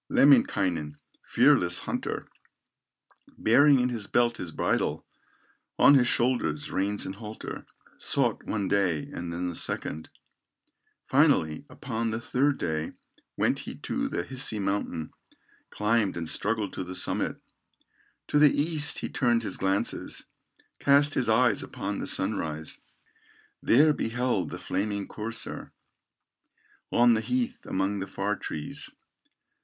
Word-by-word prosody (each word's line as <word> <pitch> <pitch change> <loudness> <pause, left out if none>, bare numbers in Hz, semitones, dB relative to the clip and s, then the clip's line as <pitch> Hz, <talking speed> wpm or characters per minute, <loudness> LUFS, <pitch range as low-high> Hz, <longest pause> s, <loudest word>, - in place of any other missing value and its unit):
Lemminkainen, 95 - +3 0.3
fearless 90 0 +4
hunter, - - -4 1.1
Bearing 140 +5 +5
in 125 0 +1
his 115 -5 -4
belt 120 -1 +2
his 90 - -6
bridle, - - -1 0.7
On 145 - +7
his 130 -3 +5
shoulders, 130 +5 0
reins 100 +2 -1
and 95 - -4
halter, 110 +1 -8 0.3
Sought - - 0
one 100 -3 -2
day, 95 -7 0
and 85 0 -5
then 90 +1 -3
a - - -8
second, 80 0 -1 1.0
Finally, 75 -1 +2
upon 115 0 -3
the 110 0 -2
third 135 +4 +1
day, 80 0 -3 0.4
Went - - +1
he - - -7
to - - -3
the 85 - -3
Hisi 130 +1 -1
mountain, 95 -5 -2 0.6
Climbed, 105 -3 0
and 85 -1 -4
struggled 105 +3 -1
to - - -4
the 90 +1 -7
summit; - - -1 0.9
To 150 - +3
the 150 -1 +5
east 155 0 +2
he - - -2
turned 120 -4 +1
his 95 - -3
glances, 95 +1 -1 0.5
Cast 145 +1 +4
his 125 -4 +1
eyes 110 -1 +3
upon - - -4
the - - -4
sunrise, 80 -6 -2 0.8
There 150 +6 +5
beheld 115 - -1
the - - -6
flaming 100 +1 -3
courser, 110 +1 -6 1.2
On 120 0 +5
the 110 - +1
heath 250 - -2
among 95 +2 -1
the 95 - -4
far 100 +2 -2
trees. 75 -5 -5
110 Hz, 130 wpm, -27 LUFS, 95-125 Hz, 1.2 s, On